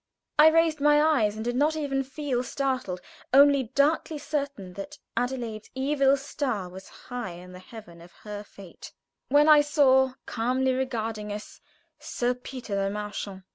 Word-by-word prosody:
I 305 - +9
raised 320 -1 +3
my 295 0 +5
eyes, 275 -10 +2
and 220 +1 -5
did 240 0 -1
not 300 +4 +2
even 280 -3 -1
feel 270 -2 -3
startled, 255 -8 -2 0.3
only 280 0 +6
darkly 305 +2 +2
certain 280 -10 -4
that 245 +11 -8 0.2
Adelaide's 240 -3 -3
evil 275 0 +2
star 265 -8 -3
was 190 +2 -11
high 245 -7 -7
in 180 +1 -12
the 180 - -11
heaven 185 -4 -13
of 175 +1 -15
her 210 -1 -6
fate, 195 -3 -13 0.4
when 290 +3 +5
I 305 -1 +8
saw, 265 -3 +3
calmly 255 +3 0
regarding 225 -5 -3
us, 210 +1 -8 0.4
Sir 250 -5 -1
Peter 250 -3 -7
Le 195 0 0
Marchant. 205 -2 -6
255 Hz, 155 wpm, -26 LUFS, 210-285 Hz, 0.4 s, I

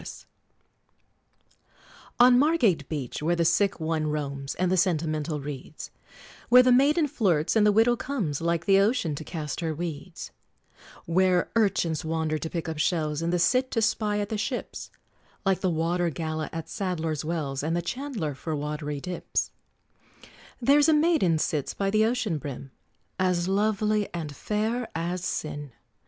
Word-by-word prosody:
"] - - -13 2.2
On 245 0 +7
Margate 240 - +2
beach, 145 -5 -4
where 170 +3 +1
the 170 -1 +1
sick 185 +4 +2
one 160 -1 -1
roams, 140 -2 -3
And 180 0 0
the - - +3
sentimental 155 -4 0
reads; 145 +1 -8 0.6
Where 250 +1 +8
the 255 - +4
maiden 295 +5 +4
flirts, 180 - +1
and 210 -1 +5
the - - +5
widow 225 +3 +4
comes 215 - -3
Like 170 0 0
the 195 -1 +5
ocean 200 - +1
to 145 - -6
cast 150 -3 -5
her 160 -2 -2
weeds; 165 +1 -6 0.7
Where 180 +1 +2
urchins 175 -8 +1
wander 160 -1 -1
to 160 - -4
pick 170 0 -4
up 160 -2 -4
shells, 155 -2 0
And 165 +1 -1
the 180 - +2
Cit 255 +10 +2
to 225 - 0
spy 210 -1 +1
at 205 0 -2
the 215 -2 -2
ships, 245 +4 -4 0.6
Like 190 -1 +2
the 185 - +1
water 170 +1 0
gala 155 -1 -4
at 165 -1 -6
Sadler's 165 -5 -3
Wells, 150 -4 -2
And 160 +3 -1
the - - 0
Chandler 235 - -3
for 155 +3 -4
watery 150 0 -4
dips; 180 +1 -3 1.1
There's 285 +5 +4
a - - +5
maiden 300 - +3
sits 150 -2 -2
by 195 -1 -1
the 215 +1 +3
ocean 225 -9 -1
brim, 135 -1 -7 0.5
As 180 -2 +1
lovely 210 +1 +1
and 155 -4 -5
fair 220 - -2
as 170 +2 -2
sin! 145 -6 -4
175 Hz, 160 wpm, -26 LUFS, 155-215 Hz, 2.2 s, Where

